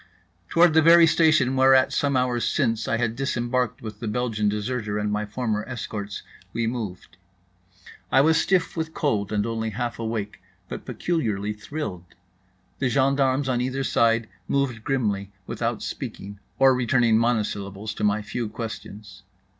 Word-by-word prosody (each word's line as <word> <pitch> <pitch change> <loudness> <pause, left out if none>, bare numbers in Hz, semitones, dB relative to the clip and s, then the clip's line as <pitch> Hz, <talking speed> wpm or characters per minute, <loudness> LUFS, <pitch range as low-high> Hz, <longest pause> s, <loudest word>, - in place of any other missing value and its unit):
Toward 170 -1 +5
the 160 - +6
very 165 +1 +8
station 155 -5 +3
whereat 130 0 +5
some 140 -2 +1
hours 125 -2 0
since 115 0 0
I 115 - +1
had 115 -1 -1
disembarked 125 -3 -1
with 110 -2 -7
the 115 - -4
Belgian 110 -2 0
deserter 105 0 -2
and 105 0 -1
my 105 0 -1
former 110 -1 -2
escorts, 105 -5 -5 0.3
we 115 0 -1
moved. 110 -9 -5 0.9
I - - +5
was 160 +2 +4
stiff 180 -4 +1
with 160 -1 -4
cold 110 -10 0
and 105 -1 0
only 115 -1 -2
half 120 +2 -4
awake, 110 -4 -4 0.3
but - - -7
peculiarly 105 - -1
thrilled. 105 - -7 0.6
The 130 - +1
gendarmes 135 +1 +2
on 125 -2 +1
either 130 +2 -2
side 115 -3 +2 0.2
moved 130 -5 -1
grimly, 105 -8 -1
without - - -3
speaking; 100 0 -6 0.2
or 135 0 +6
returning 120 -2 +3
monosyllables 105 -3 -1
to - - -6
my 105 +1 +2
few 115 +1 -4
questions. 105 -3 -8
115 Hz, 150 wpm, -24 LUFS, 105-130 Hz, 0.9 s, very